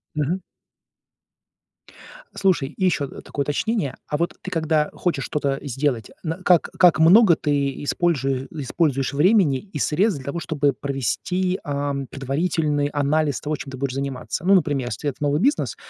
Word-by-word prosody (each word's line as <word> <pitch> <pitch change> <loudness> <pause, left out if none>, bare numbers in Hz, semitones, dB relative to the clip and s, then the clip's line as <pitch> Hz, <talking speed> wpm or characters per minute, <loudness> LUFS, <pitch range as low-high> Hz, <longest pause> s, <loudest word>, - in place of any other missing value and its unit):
Мгм. 160 +5 -1 1.9
Слушай 180 -8 +1
и 185 +5 -2
ещё, 155 -6 +1
э, - - -10
такое 140 - -3
уточнение. 145 - -1
А 150 - -1
вот 170 +2 -1
ты 185 - -6
когда 155 -2 +1
хочешь 165 -7 -1
что-то 140 -2 -1
сделать, 135 -4 -2
на 165 +1 -3
как 175 -3 +4
как 175 -3 +6
много 180 +3 +7
ты 140 -3 -1
испольжуе 135 -5 0
используешь 140 -2 -1
времени 160 -2 +4
и 190 -2 -9
средств 180 +5 +1
для 130 - -11
того, 140 +5 -3
чтобы 145 -4 0
провести, 160 - -2
ам, 140 -1 -2
предварительный 145 +2 -1
анализ 145 -2 0
того, 150 +1 -2
чем 140 - -8
ты 130 - -7
будешь 135 -1 -2
заниматься. 135 +3 -4
Ну, 195 +1 +6
например, 145 -7 +1
если 135 +7 -3
это 135 - -8
новый 145 0 +1
бизнес, 280 +8 +1
145 Hz, 160 wpm, -22 LUFS, 140-170 Hz, 1.9 s, много